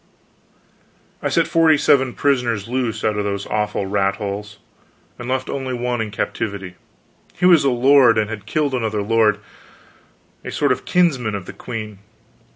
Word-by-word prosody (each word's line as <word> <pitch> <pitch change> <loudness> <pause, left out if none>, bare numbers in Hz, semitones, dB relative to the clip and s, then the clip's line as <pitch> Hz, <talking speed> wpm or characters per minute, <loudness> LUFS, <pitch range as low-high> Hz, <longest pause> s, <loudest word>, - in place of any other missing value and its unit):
I - - -1
set - - +2
forty 160 -2 +4
seven 130 -3 +3
prisoners 120 -7 0
loose 120 -3 -2
out 105 -1 0
of - - 0
those 100 -1 -3
awful 105 -1 -2
rat 100 0 0
holes, 105 0 -6 0.6
and 120 +1 -6
left 130 0 -1
only 130 -2 -3
one 120 -1 -2
in 110 - -3
captivity. 100 -2 -4 0.6
He - - 0
was 175 -5 +6
a 140 - +3
lord, 125 -1 +5
and 110 -1 +1
had 105 -2 -7
killed 145 +4 0
another 110 -4 -1
lord, 110 -1 +3 1.1
a - - -6
sort - - +1
of - - -2
kinsman 135 -12 +1
of 100 -3 -6
the - - -9
queen. 110 -4 -7
115 Hz, 160 wpm, -20 LUFS, 105-130 Hz, 1.1 s, was